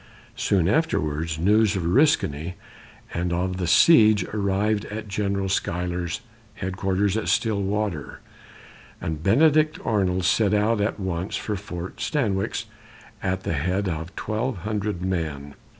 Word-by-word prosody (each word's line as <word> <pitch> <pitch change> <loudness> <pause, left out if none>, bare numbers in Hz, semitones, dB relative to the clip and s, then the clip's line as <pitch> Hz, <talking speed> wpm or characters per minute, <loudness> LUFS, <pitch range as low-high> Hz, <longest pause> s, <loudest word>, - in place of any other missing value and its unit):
Soon 95 -5 +1
afterwards, 80 - 0
news 105 +4 +3
of 95 - -1
Oriskany 85 - +2 0.6
and 85 +1 -1
of 90 +1 -1
the 90 -2 -2
siege 110 - +6
arrived 100 0 0
at 110 +1 -6
General 100 -1 -1
Schuyler's 90 -1 -2 0.3
headquarters 95 +1 -1
at 110 - -2
Stillwater, 100 - -1 0.8
and 80 -2 -4
Benedict 155 - +4
Arnold 95 -4 +1
set 105 +2 +3
out 105 +1 +2
at 105 +1 -1
once 95 -1 -3
for 105 - -2
Fort 90 -2 -7
Stanwix 105 -10 -1 0.6
at 95 0 -2
the - - -1
head 90 +6 0
of 85 +2 -4
twelve 110 +2 -2
hundred 105 -4 -2
men. 80 -6 -3
95 Hz, 125 wpm, -24 LUFS, 90-105 Hz, 0.8 s, siege